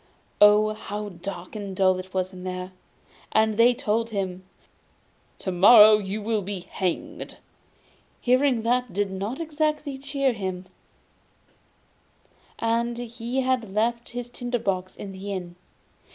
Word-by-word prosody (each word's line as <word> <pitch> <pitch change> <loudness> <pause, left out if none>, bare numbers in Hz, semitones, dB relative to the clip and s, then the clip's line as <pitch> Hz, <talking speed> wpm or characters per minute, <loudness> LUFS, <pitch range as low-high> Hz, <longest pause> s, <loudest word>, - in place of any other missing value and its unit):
Oh, 210 +1 +6
how 210 -1 -6
dark 180 +1 -8
and 200 -3 -5
dull 185 -1 +3
it 185 0 -9
was 185 0 -1
there! 185 0 -6 0.6
And 220 -1 +3
they 240 +3 +5
told 230 -1 -1
him: 190 -3 -3 0.9
'To 190 - -4
morrow 210 +3 +8
you 205 +1 -5
are - - +3
to - - -1
be 195 -1 -5
hanged.' 180 0 -4 0.8
Hearing 255 -1 +2
that 245 -2 0
did 200 0 -1
not 200 - -4
exactly 305 -3 -2
cheer 275 -1 0
him, 190 -3 -4 1.9
and 235 +1 0
he 240 +2 -3
had 250 -6 -1
left 235 +2 0
his 245 0 -6
tinder 245 0 -3
box 185 -4 -2
in 200 - -8
the 195 +1 -6
inn. 175 -2 -6
210 Hz, 135 wpm, -25 LUFS, 190-240 Hz, 1.9 s, morrow